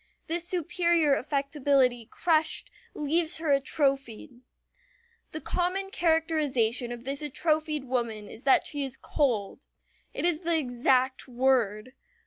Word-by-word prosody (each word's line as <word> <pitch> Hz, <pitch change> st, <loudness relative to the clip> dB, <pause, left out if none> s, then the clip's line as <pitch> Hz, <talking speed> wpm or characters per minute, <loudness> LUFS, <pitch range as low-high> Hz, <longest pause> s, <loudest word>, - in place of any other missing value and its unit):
This 340 Hz, +1 st, -2 dB
superior 340 Hz, -3 st, +2 dB
affectability 275 Hz, -4 st, +1 dB
crushed, 315 Hz, -2 st, 0 dB, 0.2 s
leaves 320 Hz, +3 st, +1 dB
her 320 Hz, -2 st, -1 dB
atrophied. 270 Hz, -2 st, -1 dB, 0.9 s
The 310 Hz, -, -6 dB
common 375 Hz, +2 st, -1 dB
characterization 300 Hz, -, +1 dB
of 240 Hz, -1 st, -7 dB
this 275 Hz, +3 st, -3 dB
atrophied 305 Hz, 0 st, 0 dB
woman 235 Hz, -5 st, -3 dB
is -, -, -11 dB
that 270 Hz, -, +4 dB
she 290 Hz, -2 st, -3 dB
is 265 Hz, -1 st, -6 dB
"cold." 250 Hz, -5 st, -1 dB, 0.4 s
It -, -, -3 dB
is 345 Hz, -3 st, +1 dB
the 335 Hz, -1 st, 0 dB
exact 260 Hz, -1 st, +1 dB
word. 250 Hz, -2 st, +1 dB
280 Hz, 115 wpm, -28 LUFS, 250-320 Hz, 0.9 s, that